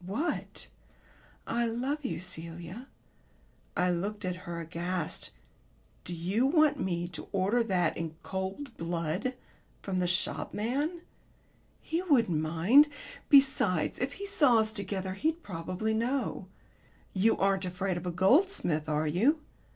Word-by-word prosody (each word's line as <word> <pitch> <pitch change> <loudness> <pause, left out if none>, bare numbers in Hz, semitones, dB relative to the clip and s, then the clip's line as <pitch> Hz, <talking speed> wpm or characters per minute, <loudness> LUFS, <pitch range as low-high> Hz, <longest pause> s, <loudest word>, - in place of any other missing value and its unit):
"What?" 215 - -3 0.8
"'I 235 0 0
love 260 +6 -2
you, 255 - -2
Celia.'" 175 +5 -7 0.9
I 180 0 +3
looked 200 +4 -2
at 180 -1 -1
her 170 -1 -3
aghast. 170 +1 -3 0.8
"Do 175 - -4
you 190 +10 +1
want 300 -1 +4
me 175 -2 -1
to 175 - -8
order 200 +5 +2
that 185 -7 +1
in 160 -1 -4
cold 195 +8 -4
blood 170 +8 -2 0.5
from 190 -2 -1
the 180 - +1
shopman?" 250 - -1 0.8
"He 330 +2 -1
wouldn't 235 - +3
mind. 180 - +5 0.4
Besides, 265 - +4
if 270 +3 -1
he 400 - -6
saw 290 - +5
us 220 0 +2
together 190 -2 -3
he'd 320 - -1
probably 185 +4 -3
know. 245 +5 -1 0.7
You 210 +4 +3
aren't 195 -1 +2
afraid 185 +1 -2
of 175 +1 -4
a - - 0
goldsmith, 185 - +2
are 150 +1 +1
you?" 220 - +3
195 Hz, 130 wpm, -30 LUFS, 175-255 Hz, 0.9 s, mind